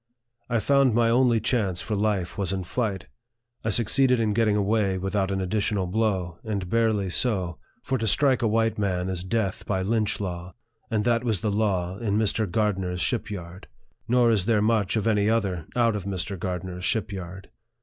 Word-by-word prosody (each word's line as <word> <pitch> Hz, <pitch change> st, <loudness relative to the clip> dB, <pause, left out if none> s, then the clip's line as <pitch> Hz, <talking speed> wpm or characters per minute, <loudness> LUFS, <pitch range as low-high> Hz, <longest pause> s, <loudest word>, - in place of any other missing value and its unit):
I 120 Hz, -, +1 dB
found 135 Hz, 0 st, +3 dB
my 115 Hz, -1 st, +3 dB
only 120 Hz, -1 st, +3 dB
chance 105 Hz, -5 st, 0 dB
for 110 Hz, -, -4 dB
life 100 Hz, -4 st, -1 dB
was 95 Hz, -4 st, -1 dB
in 95 Hz, -1 st, -2 dB
flight. 95 Hz, -1 st, -2 dB, 0.6 s
I 110 Hz, -, -1 dB
succeeded 125 Hz, +3 st, +3 dB
in 110 Hz, -2 st, +1 dB
getting 110 Hz, -1 st, +2 dB
away 100 Hz, -1 st, +1 dB
without 95 Hz, +1 st, -1 dB
an 95 Hz, -1 st, -1 dB
additional 100 Hz, 0 st, -1 dB
blow, 95 Hz, -3 st, -1 dB
and 100 Hz, -4 st, -3 dB
barely 110 Hz, -5 st, +1 dB
so; 95 Hz, -7 st, +1 dB, 0.2 s
for 130 Hz, -1 st, -1 dB
to 110 Hz, -, -1 dB
strike 135 Hz, +3 st, +3 dB
a 115 Hz, -, +2 dB
white 110 Hz, 0 st, +1 dB
man 95 Hz, -2 st, -1 dB
is 90 Hz, -2 st, -3 dB
death 95 Hz, 0 st, -2 dB
by 95 Hz, -2 st, 0 dB
Lynch 110 Hz, +1 st, 0 dB
law, 90 Hz, -2 st, -5 dB, 0.3 s
and 110 Hz, -3 st, 0 dB
that 115 Hz, 0 st, +1 dB
was 110 Hz, -7 st, -1 dB
the 105 Hz, -, 0 dB
law 95 Hz, -3 st, -1 dB
in 105 Hz, -3 st, 0 dB
Mr. 110 Hz, -1 st, +1 dB
Gardner's 95 Hz, -3 st, -1 dB
ship 115 Hz, +4 st, -1 dB
yard; 90 Hz, -2 st, -8 dB, 0.4 s
nor 120 Hz, -1 st, +4 dB
is 100 Hz, -3 st, +1 dB
there 115 Hz, -3 st, +3 dB
much 105 Hz, -2 st, +1 dB
of 110 Hz, -, 0 dB
any 105 Hz, -2 st, +2 dB
other 95 Hz, -8 st, -1 dB
out 115 Hz, -3 st, +2 dB
of 100 Hz, -3 st, -4 dB
Mr. 100 Hz, 0 st, -3 dB
Gardner's 90 Hz, 0 st, -5 dB
ship 105 Hz, +1 st, 0 dB
yard. 95 Hz, 0 st, -8 dB
105 Hz, 190 wpm, -25 LUFS, 95-115 Hz, 0.6 s, nor